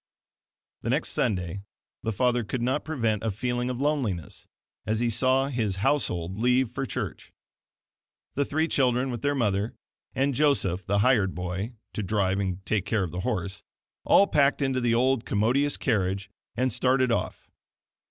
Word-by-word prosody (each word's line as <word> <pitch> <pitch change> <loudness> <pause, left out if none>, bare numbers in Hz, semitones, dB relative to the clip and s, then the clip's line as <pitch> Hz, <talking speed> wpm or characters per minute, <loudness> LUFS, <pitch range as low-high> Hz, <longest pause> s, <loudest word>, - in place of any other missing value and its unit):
The - - -3
next - - +1
Sunday 95 -4 -1 0.4
the 115 - -2
father 120 +2 +1
could 115 +3 -3
not 130 +4 0
prevent 115 -9 -1
a 110 - -1
feeling 120 +4 -2
of 125 -1 -3
loneliness 130 - -2 0.4
as 110 0 -1
he 120 -1 +1
saw 130 +4 +2
his 110 -7 -1
household 95 - 0
leave 125 0 +2
for 135 +2 -3
church. - - -5 1.0
The 140 - +1
three 155 +3 0
children, 130 -3 +1
with 120 - -5
their 145 0 +1
mother 105 -3 0 0.4
and 135 +1 +1
Joseph, 120 - +1
the 100 +1 +2
hired 105 -8 +3
boy, 90 +6 -4 0.2
to - - -3
drive 95 -1 0
and 95 -1 -3
take 105 -2 0
care 105 -3 +1
of 90 - -4
the 90 - -4
horse; 95 -4 -2 0.4
all 200 - +6
packed 145 -5 +2
into 130 -1 0
the 120 -1 +2
old 130 0 +2
commodious 125 +9 +1
carriage 100 -4 -1 0.3
and 130 -2 +1
started 130 +1 +2
off. - - -3
120 Hz, 160 wpm, -27 LUFS, 100-130 Hz, 1.0 s, all